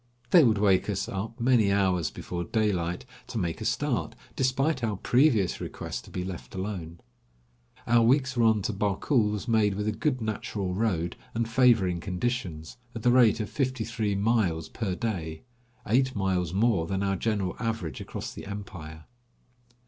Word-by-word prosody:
They 175 -3 +8
would 110 -5 +4
wake 100 -1 +3
us 100 -2 -1
up 110 +4 -5
many 115 -4 +3
hours 95 -4 +2
before 85 -1 -5
daylight 100 -5 -1 0.2
to 125 - -5
make 90 0 -2
a - - -3
start, 125 +2 -1 0.2
despite 130 +1 +1
our 110 -3 0
previous 120 - +2
request - - -5
to - - -13
be 90 - -4
left 95 0 -7
alone. 95 -4 -5 0.9
Our 120 0 +4
week's 130 +2 +3
run 110 -4 +3
to 110 - -1
Barkul 105 +4 +1
was 105 +3 -4
made, 110 -4 +3
with 105 +1 -2
a - - +2
good 130 +4 -1
natural 110 -4 -3
road 90 -5 -1 0.2
and 115 0 0
favoring 115 -7 +3
conditions, 90 -4 -3 0.2
at 115 - -6
the 125 - +5
rate 120 -3 +5
of 105 - -4
fifty 130 -4 -1
three 110 -3 -1
miles 100 -6 +1
per 100 -6 -3
day, 85 -8 -4 0.4
eight 130 +4 +2
miles 95 -4 0
more 100 -4 +2
than 95 +2 -1
our 95 0 +1
general 100 -2 -1
average 115 -8 -3
across - - -6
the - - -9
empire. 85 -6 -8
105 Hz, 165 wpm, -27 LUFS, 95-120 Hz, 0.9 s, They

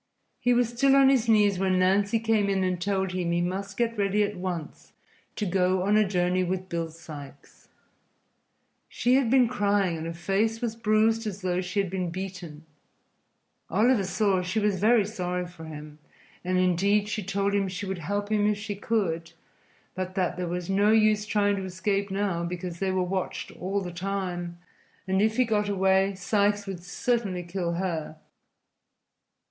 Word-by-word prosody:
He 245 - +2
was 245 -1 +3
still 270 +3 +3
on 275 -1 +6
his 250 -4 +2
knees 205 -3 +4
when 190 -1 +2
Nancy 200 +4 +2
came 220 -3 +1
in 195 -1 +1
and 180 -1 -1
told 190 -1 0
him 180 -2 -2
he 170 - +1
must 195 +3 -3
get 230 -2 -1
ready 200 +1 +2
at 205 0 -2
once 180 -4 -6 0.4
to 210 - -2
go 185 0 +1
on 205 +2 +2
a 215 -1 +4
journey 180 -1 +1
with 185 +1 -3
Bill 165 -1 -2
Sikes. 150 -4 -12 1.2
She 245 +1 +1
had 260 -3 +3
been 255 -1 +5
crying 200 -6 +1
and 160 +1 -5
her 165 - -4
face 200 +6 0
was 230 -2 -3
bruised 225 0 +2
as 200 -1 -5
though 180 -1 0
she 185 +2 -2
had 195 -3 -1
been 185 -2 -2
beaten. 175 -4 -7 1.0
Oliver 215 +3 +3
saw 195 -1 +1
she 180 +4 -3
was 205 -3 +1
very 215 +1 +4
sorry 180 -4 -3
for 175 -2 -11
him, 150 -1 -9 0.4
and, 185 +1 0
indeed, 195 +3 +2
she 210 +1 -3
told 200 +1 -1
him 200 -1 +1
she 185 +2 -5
would 190 -2 -4
help 205 +5 -3
him 210 -1 +2
if 210 - 0
she 205 0 -4
could, 170 -6 -2 0.6
but 185 0 -5
that 180 -2 0
there 180 0 -3
was 175 0 -3
no 200 +2 +3
use 215 -1 +3
trying 205 -1 +2
to 190 - -4
escape 195 +2 -1
now, 195 -3 -1
because 175 0 -5
they 195 - 0
were 185 -1 +1
watched 185 +1 -3
all 195 +2 -3
the 180 -2 -6
time, 180 -2 -4 0.5
and 190 +1 +2
if 220 +2 +1
he 255 - +4
got 210 -2 0
away 190 0 +2
Sikes 205 +1 +1
would 190 -3 -6
certainly 195 -1 -1
kill 175 -1 -3
her. 170 -3 -3
195 Hz, 180 wpm, -27 LUFS, 180-210 Hz, 1.2 s, on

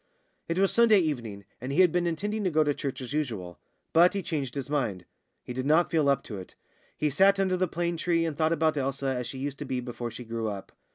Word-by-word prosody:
It 165 - -2
was 195 0 +3
Sunday 230 -2 +6
evening, 120 - -2 0.2
and 130 +2 -4
he 165 - +4
had 180 -3 +5
been 175 0 +1
intending 205 +6 -2
to 185 - +2
go 155 -2 +3
to 145 -1 +1
church 135 -1 -4
as 130 +2 -6
usual. 110 - -3 0.3
But 175 +4 +6
he 195 - -1
changed 140 -7 -3
his 140 -2 -3
mind. 115 -12 -1 0.4
He 125 - -6
did 130 +2 -3
not 160 +3 +4
feel 155 -4 +3
up 140 -1 +2
to 105 -5 -7
it. 95 - -11 0.4
He 150 -1 0
sat 195 +6 +4
under 190 -1 +2
the 185 0 +1
plane 170 +1 -2
tree 165 0 +1
and 160 -2 -2
thought 160 +1 +1
about 160 -2 +2
Elsa 140 0 -2
as 125 -1 -3
she 130 - -6
used 140 +1 -4
to 145 - -4
be 130 -1 -2
before 120 -1 -5
she 120 +2 -9
grew 115 -1 -3
up. 100 -2 -6
145 Hz, 250 wpm, -28 LUFS, 125-170 Hz, 0.4 s, Sunday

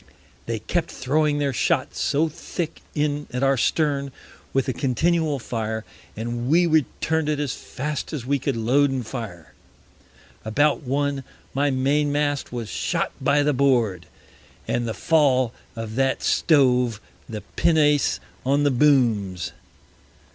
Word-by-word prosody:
They 115 -1 -1
kept 170 - -2
throwing 145 +3 +1
their 140 -2 0
shot - - +1
so 150 +3 +1
thick 165 +1 -5
in 145 -1 -1
at 125 +2 -2
our 135 0 +4
Stern, 140 +1 0 0.4
with 135 -1 0
a 130 - 0
continual 155 +5 +1
Fire, 110 -3 -3 0.3
and 120 +2 -3
we 175 +3 +5
return'd 160 0 +1
it 150 -1 0
as 145 -3 -1
fast 150 +2 -5
as 145 -7 -4
we 140 +1 +1
could 135 0 -1
load 135 +6 +3
and 130 -3 -2
fire. 110 - -7 0.9
About 145 +9 +2
One, 140 0 -1 0.3
my 145 +2 +2
Main 140 +3 +1
mast 145 -1 -1
was 120 -2 -4
shot - - -1
by 145 +1 +3
the 150 0 +2
Board, 120 -10 +2 0.6
and 120 -1 0
the 110 - -3
Fall 130 - +3 0.2
of 115 -1 -5
that 135 -1 +1
stove 125 -7 +3 0.3
the 110 -2 -5
Pinnace 150 -3 +3 0.2
on 140 +3 +2
the 145 - +3
Booms. 120 - +2
135 Hz, 140 wpm, -23 LUFS, 120-150 Hz, 0.9 s, we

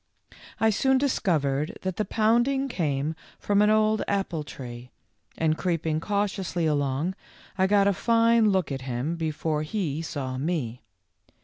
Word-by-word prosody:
I 220 0 +4
soon 265 +5 +3
discovered 155 - 0
that 190 -1 -3
the 215 - 0
pounding 240 +7 +2
came 155 - -1 0.2
from 205 0 +2
an 210 - +4
old 215 0 +3
apple 195 -6 -1
tree, 125 -3 -9 0.5
and 155 -1 +2
creeping 165 -3 -1
cautiously 195 -2 -1
along, 145 +3 0 0.4
I 190 -1 +2
got 200 0 +4
a 200 - +3
fine 230 +4 +3
look 190 -6 +1
at 135 -1 -3
him 130 +5 -2
before 155 -1 -2
he 155 -2 -2
saw 135 -6 -4
me. 135 -6 -2
170 Hz, 140 wpm, -26 LUFS, 150-210 Hz, 0.5 s, I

